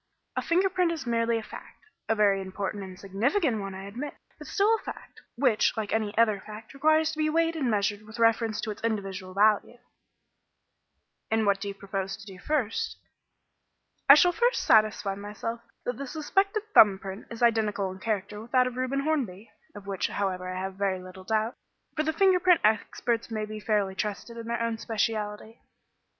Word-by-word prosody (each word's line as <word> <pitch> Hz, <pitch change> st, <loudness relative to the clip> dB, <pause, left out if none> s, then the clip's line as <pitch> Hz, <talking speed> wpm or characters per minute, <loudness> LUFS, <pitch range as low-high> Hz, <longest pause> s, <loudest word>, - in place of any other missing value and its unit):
A -, -, 0 dB
finger 360 Hz, +3 st, +2 dB
print 365 Hz, -2 st, +1 dB
is 320 Hz, -5 st, -4 dB
merely 230 Hz, -1 st, +1 dB
a 225 Hz, -, -4 dB
fact -, -, -12 dB, 0.3 s
a 225 Hz, -, +3 dB
very 200 Hz, -2 st, +3 dB
important 195 Hz, +1 st, -4 dB
and 185 Hz, -1 st, -10 dB
significant 225 Hz, -, 0 dB
one, 195 Hz, -1 st, -6 dB
I 190 Hz, -, -7 dB
admit 245 Hz, +9 st, -6 dB, 0.2 s
but -, -, -10 dB
still 420 Hz, +2 st, +3 dB
a 450 Hz, -, +1 dB
fact, -, -, -9 dB
which, 245 Hz, -4 st, +2 dB
like 215 Hz, -2 st, -2 dB
any 215 Hz, -1 st, -1 dB
other 215 Hz, -3 st, +4 dB
fact, 215 Hz, +2 st, -10 dB
requires 310 Hz, +3 st, +3 dB
to 310 Hz, -, -8 dB
be 310 Hz, 0 st, +2 dB
weighed 330 Hz, +1 st, +1 dB
and 275 Hz, -6 st, 0 dB
measured 205 Hz, -1 st, 0 dB
with 220 Hz, +2 st, -12 dB
reference 230 Hz, -1 st, +2 dB
to 220 Hz, -, -3 dB
its 210 Hz, -, -10 dB
evidential 195 Hz, -4 st, -3 dB
value." 210 Hz, +3 st, +3 dB, 1.5 s
"And 220 Hz, 0 st, +2 dB
what 200 Hz, -1 st, +2 dB
do 205 Hz, -, -3 dB
you 200 Hz, -, -5 dB
propose 195 Hz, -1 st, -4 dB
to -, -, -13 dB
do 190 Hz, -3 st, -11 dB
first?" 250 Hz, -3 st, -1 dB, 1.1 s
"I 280 Hz, -, +12 dB
shall 355 Hz, +4 st, +5 dB
first 480 Hz, +6 st, +1 dB
satisfy 215 Hz, -2 st, +3 dB
myself 210 Hz, +3 st, -5 dB, 0.2 s
that 245 Hz, -2 st, -2 dB
the 280 Hz, -, -5 dB
suspected 390 Hz, -, 0 dB
thumb 205 Hz, -3 st, +8 dB
print 195 Hz, +1 st, -8 dB
is 230 Hz, 0 st, -5 dB
identical 215 Hz, -4 st, +2 dB
in 190 Hz, -, -10 dB
character 210 Hz, 0 st, -3 dB
with 230 Hz, -, -12 dB
that 255 Hz, -1 st, +5 dB
of 250 Hz, 0 st, -4 dB
Reuben 260 Hz, +2 st, 0 dB
Hornby 245 Hz, -10 st, -2 dB, 0.2 s
of 205 Hz, -1 st, -10 dB
which, 195 Hz, -2 st, -1 dB
however, 185 Hz, -2 st, -2 dB
I 185 Hz, 0 st, -4 dB
have 190 Hz, +1 st, -4 dB
very 195 Hz, -2 st, 0 dB
little 185 Hz, +1 st, -11 dB
doubt, 220 Hz, +3 st, 0 dB, 0.4 s
for 310 Hz, -, +1 dB
the 310 Hz, +1 st, 0 dB
finger 375 Hz, +2 st, +4 dB
print 360 Hz, -1 st, +4 dB
experts 225 Hz, +2 st, +1 dB
may 215 Hz, -1 st, -4 dB
fairly 205 Hz, -2 st, 0 dB
be -, -, -16 dB
trusted 210 Hz, +2 st, -3 dB
in 230 Hz, -1 st, -7 dB
their 235 Hz, 0 st, -1 dB
own 230 Hz, -1 st, -2 dB
speciality." 220 Hz, 0 st, -3 dB
220 Hz, 190 wpm, -28 LUFS, 200-255 Hz, 1.5 s, I